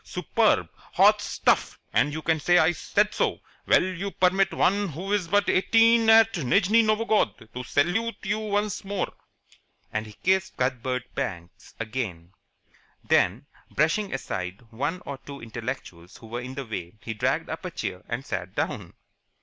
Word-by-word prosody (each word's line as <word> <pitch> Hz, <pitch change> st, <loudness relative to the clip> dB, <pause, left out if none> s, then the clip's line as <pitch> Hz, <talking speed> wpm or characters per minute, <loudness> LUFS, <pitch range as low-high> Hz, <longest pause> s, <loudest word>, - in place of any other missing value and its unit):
Grand! -, -, -21 dB
Superb! -, -, +1 dB, 0.2 s
Hot -, -, +5 dB
stuff, -, -, +1 dB, 0.2 s
and 145 Hz, -, +3 dB
you 155 Hz, +1 st, -5 dB
can 160 Hz, -1 st, +1 dB
say 175 Hz, +4 st, +4 dB
I 175 Hz, -, +5 dB
said 205 Hz, +4 st, 0 dB
so! -, -, 0 dB, 0.3 s
Will -, -, +5 dB
you 185 Hz, +1 st, -3 dB
permit 190 Hz, +1 st, +2 dB
one 200 Hz, +1 st, +1 dB
who 180 Hz, +7 st, -4 dB
is 200 Hz, -5 st, 0 dB
but 205 Hz, +3 st, +2 dB
eighteen 225 Hz, +3 st, +4 dB
at 225 Hz, 0 st, +7 dB
Nijni 200 Hz, -, +3 dB
Novgorod 215 Hz, -, 0 dB
to 125 Hz, -, -5 dB
salute 180 Hz, -, 0 dB
you 210 Hz, +2 st, -1 dB
once 210 Hz, -1 st, -1 dB
more?" 195 Hz, -1 st, -3 dB, 0.8 s
And 110 Hz, 0 st, -2 dB
he 105 Hz, -, -12 dB
kissed 190 Hz, -, 0 dB
Cuthbert 125 Hz, 0 st, -1 dB, 0.8 s
again. 105 Hz, -7 st, -4 dB, 0.7 s
Then, -, -, +2 dB, 0.2 s
brushing 165 Hz, +7 st, +1 dB
aside 95 Hz, -7 st, -4 dB
one 145 Hz, +10 st, -3 dB
or 140 Hz, -1 st, -6 dB
two 140 Hz, 0 st, -10 dB
intellectuals 110 Hz, -7 st, -7 dB
who -, -, -14 dB
were 120 Hz, +2 st, -5 dB
in 130 Hz, +2 st, -7 dB
the 140 Hz, 0 st, -5 dB
way, 105 Hz, -3 st, -6 dB
he 110 Hz, -, -4 dB
dragged 105 Hz, -, 0 dB
up -, -, -5 dB
a -, -, -3 dB
chair 90 Hz, 0 st, -5 dB
and 120 Hz, +3 st, -3 dB
sat 95 Hz, 0 st, -5 dB
down. -, -, -3 dB
160 Hz, 160 wpm, -26 LUFS, -, 0.8 s, at